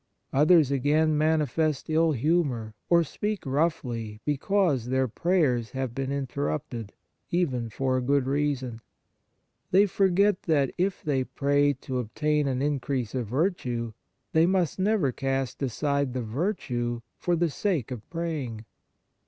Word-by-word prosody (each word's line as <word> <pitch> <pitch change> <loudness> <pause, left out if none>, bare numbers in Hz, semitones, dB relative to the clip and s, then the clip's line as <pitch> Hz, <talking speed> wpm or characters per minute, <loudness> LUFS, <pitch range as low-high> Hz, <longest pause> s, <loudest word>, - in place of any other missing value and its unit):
Others, 150 0 +5
again, 150 +3 +2
manifest 155 -1 +1
ill 160 0 +3
humour 135 -5 0 0.2
or 170 -1 +5
speak 210 +6 -3
roughly 130 -7 -1
because 150 - +1
their 130 +1 +1
prayers 130 - +1
have 130 -3 -3
been 135 +1 -3
interrupted, 135 -5 -3 0.4
even 130 -10 0
for 130 +3 0
a - - 0
good 140 +1 +2
reason. 135 -4 -1 0.9
They 195 +3 +5
forget 195 0 +2
that 145 -5 +1
if 185 +1 -1
they 140 -4 +1
pray 145 +2 +2
to 130 -1 -3
obtain 150 +5 0
an 130 0 -1
increase 135 -5 -1
of 125 -4 -2
virtue, 125 - -1 0.4
they 160 +1 +5
must 185 -3 +1
never 190 -8 +2
cast 135 0 -2
aside 140 +1 0
the 130 -2 -2
virtue 120 - -2 0.2
for 175 - +1
the 170 -1 +1
sake 165 - -1
of 115 -4 -7
praying. 150 -10 -4
140 Hz, 135 wpm, -27 LUFS, 125-165 Hz, 0.9 s, Others